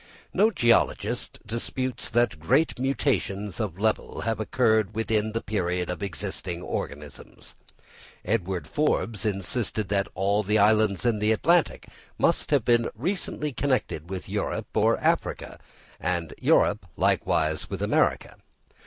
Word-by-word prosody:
No 215 +2 +4
geologist 120 - +1
disputes 120 +3 -3
that 120 -7 +1
great 130 - +2
mutations 105 - -1
of 100 -6 -3
level 110 +2 -1
have 115 0 -1
occurred 110 -2 +1
within 110 -1 0
the 115 - -2
period 90 -4 -1
of 90 - -6
existing 90 -1 -5
organisms. 75 -3 -7 0.7
Edward 95 -3 -1
Forbes 115 -7 0
insisted 105 +1 -2
that 100 -1 +1
all 100 +3 +2
the 105 +1 +1
islands 105 0 +3
in 115 -3 +2
the 105 +1 +2
Atlantic 165 +9 +2 0.3
must - - +2
have - - +2
been 120 -1 +3
recently 150 - -2
connected 125 - -1
with 95 -1 -5
Europe - - -3
or - - +3
Africa, - - -1 0.4
and 85 -2 -2
Europe 100 -2 +3
likewise 80 -1 +1
with - - -4
America. - - +1
105 Hz, 125 wpm, -26 LUFS, 95-120 Hz, 0.7 s, No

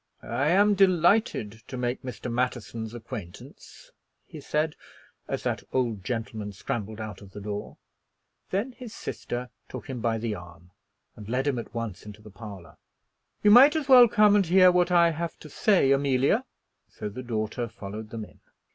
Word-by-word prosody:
"I 140 - -1
am 205 +4 +5
delighted 180 - +2
to 130 - -6
make 125 0 -2
Mr. 125 -1 -6
Matterson's 115 -2 -3
acquaintance," 105 -6 -10 0.3
he - - -10
said, 155 +1 -1 0.5
as - - -3
that - - -1
old 115 -7 -1
gentleman 110 -2 -4
scrambled 110 +2 -5
out 110 -2 -7
of 95 -1 -14
the 105 - -7
door. 105 0 -6 0.7
Then 205 +8 -1
his 240 -3 -10
sister 125 0 -5 0.2
took - - -8
him 130 -3 -5
by 115 -1 0
the 110 -1 -2
arm 90 -2 -11 0.4
and 105 0 -10
led 130 +3 0
him 140 -4 0
at 115 - -9
once 115 -5 -4
into 105 0 -11
the 105 - -12
parlor. 100 -6 -11 0.7
"You 210 - +6
might 270 +7 +8
as 310 -3 -1
well 250 -3 +9
come 210 -2 +5
and 200 -4 +3
hear 185 +1 +6
what 180 0 +2
I 170 -1 +5
have 165 +1 -4
to 155 - -13
say, 185 -11 +3
Amelia." 135 -1 +2 0.4
So 105 - -6
the 110 +5 -7
daughter 115 0 -3
followed 105 -1 -8
them 110 -1 -6
in. - - -20
120 Hz, 175 wpm, -27 LUFS, 105-175 Hz, 0.7 s, well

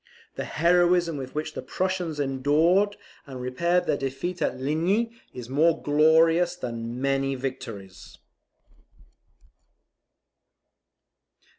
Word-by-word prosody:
The - - -5
heroism 175 0 +2
with 130 -1 -7
which 155 +1 -3
the - - -5
Prussians 180 -5 -2
endured 155 +9 +2 0.3
and 130 -2 -8
repaired 170 +8 0
their - - +1
defeat 135 +7 -4
at - - -1
Ligny, 170 - 0 0.2
is 125 -2 -8
more 155 +5 +2
glorious 160 +4 +3
than 115 -4 -5
many 135 0 0
victories. 115 -8 -7
155 Hz, 100 wpm, -25 LUFS, 130-175 Hz, 0.3 s, glorious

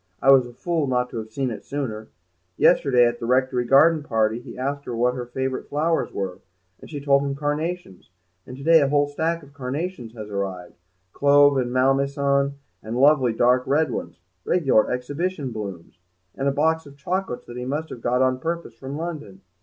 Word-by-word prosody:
I 135 - +5
was 130 -2 +5
a - - -11
fool 160 +3 -1
not 125 -1 0
to - - -6
have 110 -1 -5
seen 130 +1 -2
it 110 - -7
sooner. 115 -7 -4 0.5
Yesterday, 125 -4 +4
at 120 0 -1
the 115 - -4
Rectory 125 -1 +1
garden 155 +5 +5
party, 110 -4 0
he 120 - -11
asked 140 +2 -3
her 120 - -4
what 125 +1 +2
her 125 -1 -5
favourite 130 +1 -3
flowers 160 +3 0
were, 95 -2 -4 0.4
and - - -13
she 145 - -5
told 140 -1 +3
him 140 -1 -2
carnations, 150 - -4 0.4
and 125 - -9
to 135 - -9
day 165 +1 +6
a 140 - +3
whole 145 +1 +2
stack 160 +3 -2
of 140 0 -16
carnations 135 -1 -5
has 110 -2 -7
arrived, 95 -3 -4 0.4
clove 145 0 +5
and 125 -2 -1
malmaison 140 +2 +1 0.3
and 110 +2 -5
lovely 135 -2 +4
dark 125 +3 +3
red 150 +3 +2
ones, - - -5 0.3
regular 135 -11 +2
exhibition 145 +3 -3
blooms, 100 -6 -7 0.3
and 135 - -2
a - - +3
box 160 +2 +1
of 140 0 -15
chocolates 175 -2 -3
that 120 - -9
he 125 - -4
must 150 +5 -3
have 120 - -8
got 125 +2 +2
on 130 0 +1
purpose 165 -4 -4
from 135 +5 -7
London. 150 - -6
135 Hz, 195 wpm, -23 LUFS, 120-145 Hz, 0.5 s, day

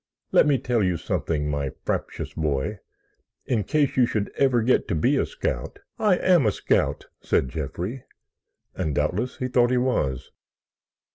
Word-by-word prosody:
Let - - +5
me 145 -2 +4
tell 125 -2 0
you 90 -3 +1
something, 75 -2 -2
my 70 -2 -1 0.2
fraptious - - -3
boy, 75 +6 -2 0.7
in 115 -5 0
case 145 +5 +1
you 125 -2 +4
should 105 -4 -2
ever 130 -4 +3
get 125 +3 +2
to - - -1
be 75 - +2
a - - +1
scout——" - - -4 0.2
"I 205 -4 +3
am 175 -11 +4
a - - +4
scout," - - 0 0.2
said 65 - +1
Jeffrey, 85 - -5 0.7
and 80 -6 -2
doubtless 90 +12 -1
he 125 - -2
thought 120 -1 +3
he 125 - +2
was. 75 - -1
110 Hz, 160 wpm, -24 LUFS, 75-130 Hz, 0.7 s, Let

